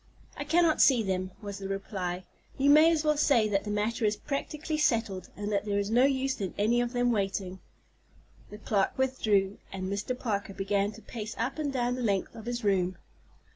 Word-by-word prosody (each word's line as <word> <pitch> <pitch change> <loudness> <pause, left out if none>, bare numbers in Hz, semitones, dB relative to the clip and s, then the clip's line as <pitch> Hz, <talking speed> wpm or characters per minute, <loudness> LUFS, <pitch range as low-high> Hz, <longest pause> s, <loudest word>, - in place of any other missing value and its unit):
"I 290 - -5
cannot 325 +1 +3
see 250 -5 +5
them," 185 -1 -2
was 200 -1 -6
the 195 - -5
reply. 190 -2 -4 0.3
"You 280 +1 +4
may 310 +3 +7
as 320 -2 +1
well 300 -1 +2
say 255 -7 +4
that 195 0 0
the - - -4
matter 215 +3 -1
is 210 0 +2
practically 305 +2 -3
settled, 225 -9 0
and 205 +1 -3
that 200 -1 +1
there 205 -1 0
is 205 +1 -1
no 245 +3 +5
use 270 -3 0
in 190 - -3
any 230 +4 +2
of 240 0 -2
them 245 0 +2
waiting." 195 -3 -2 0.9
The 210 - -9
clerk 210 0 0
withdrew, 215 -7 +1
and 185 -1 -4
Mr. 210 +5 -3
Parker 200 -5 -3
began 200 +1 0
to 225 - -14
pace 215 -2 -6
up 255 +6 -2
and 295 -2 -1
down 245 -2 0
the 250 - -4
length 200 -5 0
of 225 0 -10
his 240 -1 -3
room. 185 -3 +1
215 Hz, 205 wpm, -29 LUFS, 200-260 Hz, 0.9 s, may